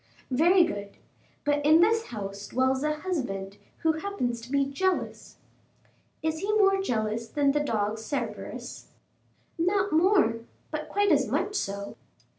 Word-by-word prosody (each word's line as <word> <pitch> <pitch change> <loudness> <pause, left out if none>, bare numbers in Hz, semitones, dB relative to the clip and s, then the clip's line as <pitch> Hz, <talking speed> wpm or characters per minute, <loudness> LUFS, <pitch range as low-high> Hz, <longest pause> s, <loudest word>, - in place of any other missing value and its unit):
"Very 345 +8 +5
good; 205 -12 -4 0.5
but 290 0 +1
in 310 +2 +6
this 445 +5 +3
house 200 -2 -6
dwells 260 +1 +1
a 300 +1 0
husband 205 - -3 0.3
who 320 - +4
happens 250 -12 -2
to 240 +3 -11
be 280 -1 +3
jealous." 370 +7 -2 0.9
"Is 315 0 -1
he 400 +4 -1
more 390 -2 +4
jealous 225 - -1
than 280 +3 +2
the 295 - +1
dog 220 -6 -1
Cerberus?" 240 +1 -5 0.7
"Not 390 +4 +1
more, 335 - +4 0.3
but - - -4
quite 410 0 +2
as - - +3
much 410 - -1
so." 200 - -3
290 Hz, 140 wpm, -27 LUFS, 225-370 Hz, 0.9 s, in